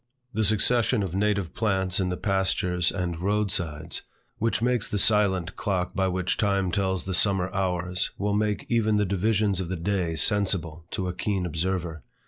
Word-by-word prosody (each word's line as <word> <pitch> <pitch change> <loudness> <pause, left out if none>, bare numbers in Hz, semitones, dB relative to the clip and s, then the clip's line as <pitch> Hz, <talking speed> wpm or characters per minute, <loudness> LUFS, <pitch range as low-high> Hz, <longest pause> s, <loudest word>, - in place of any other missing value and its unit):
The 110 +1 0
succession 110 +2 +3
of 90 -3 -4
native 100 -3 0
plants 95 -4 0
in 95 -1 0
the 90 - -2
pastures 95 -3 +1
and 90 -3 -3
roadsides, 90 -6 -1 0.4
which 115 -2 +1
makes 120 -1 +1
the 105 - -1
silent 95 -4 +2
clock 90 -3 -2
by 95 -1 +1
which 90 0 -1
time 100 -3 +1
tells 95 -3 0
the 95 - -3
summer 95 -1 +2
hours, 90 -1 -1
will 100 +1 -1
make 105 0 0
even 110 -3 +2
the 105 - +2
divisions 100 +1 +1
of 90 -3 -3
the 95 - -2
day 85 -1 -1
sensible 85 -3 +1
to 95 - -3
a 90 - -2
keen 95 -1 -2
observer. 85 -1 -2
95 Hz, 170 wpm, -26 LUFS, 90-105 Hz, 0.4 s, succession